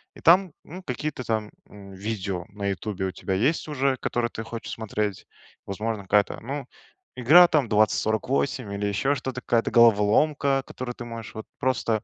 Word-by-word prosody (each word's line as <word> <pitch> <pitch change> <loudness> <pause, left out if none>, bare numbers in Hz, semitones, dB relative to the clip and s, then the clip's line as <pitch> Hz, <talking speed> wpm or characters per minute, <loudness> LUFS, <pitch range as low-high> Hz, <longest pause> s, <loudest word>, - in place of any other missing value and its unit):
и - - -13
там, 180 +2 +5
ну, 185 +4 -10
какие-то 135 -1 -4
там, 110 -2 -2 0.2
м, 100 -1 -12
видео 95 -3 -4
на 100 0 -5
"Ютубе" 100 0 -3
у 95 - -3
тебя 95 +2 -4
есть 135 - +1
уже, 135 -3 0
которые 120 0 -1
ты 110 - -6
хочешь 115 0 -7
смотреть. 105 -2 -3 0.4
Возможно, 105 +1 -3
какая-то, 100 +1 +1
ну, 135 +2 -5 0.5
игра 160 +9 +7
там 150 -7 +1
2048 110 +2 +1
или 100 +1 -2
еще 135 +8 +1
что-то, 130 -2 -5
какая-то 115 -2 +1
головоломка, 120 +5 +4
в - - -42
которую 125 -1 -6
ты - - -8
можешь 115 -1 -8
вот 110 - -7
просто, 115 -4 0
115 Hz, 170 wpm, -25 LUFS, 105-135 Hz, 0.5 s, игра